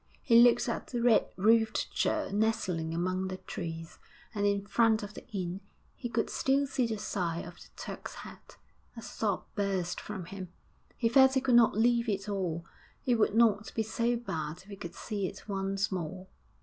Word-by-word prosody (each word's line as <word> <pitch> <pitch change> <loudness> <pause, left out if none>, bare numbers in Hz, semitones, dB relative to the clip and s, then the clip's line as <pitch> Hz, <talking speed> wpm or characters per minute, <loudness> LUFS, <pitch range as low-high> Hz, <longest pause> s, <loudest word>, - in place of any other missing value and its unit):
He 235 -2 +7
looked 240 0 +5
at - - -3
the 240 - -3
red 235 -2 +4
roofed 220 +2 +3
church - - 0
nestling 190 -7 0
among 185 +3 -1
the 185 0 -4
trees, 165 -3 -7 0.3
and 205 -1 +1
in 200 0 0
front 220 0 +3
of 205 0 -7
the - - -11
inn 185 -2 -4 0.3
he 240 - -5
could 225 -1 0
still 275 +1 +2
see 265 -3 0
the 220 -1 -2
sign 175 -5 -2
of 175 0 -11
the - - -14
'Turk's - - -7
Head.' - - -13 0.4
A 230 - -7
sob 205 -4 -2
burst 195 -4 -1
from 195 -4 -6
him; 185 0 -8 0.5
he 230 - +2
felt 265 +3 +6
he 265 - +3
could 260 -2 +1
not 235 -3 +6
leave 235 +1 +3
it 195 -1 -2
all; 180 -5 -2 0.4
it 245 -3 +2
would 210 - +2
not 220 -2 +3
be 225 - +1
so 235 +2 0
bad 160 -10 -4
if 200 - -19
he 200 - -7
could 175 -3 -8
see 200 -3 -3
it 195 - -10
once 195 0 -1
more. 185 0 -4
205 Hz, 190 wpm, -30 LUFS, 185-230 Hz, 0.5 s, He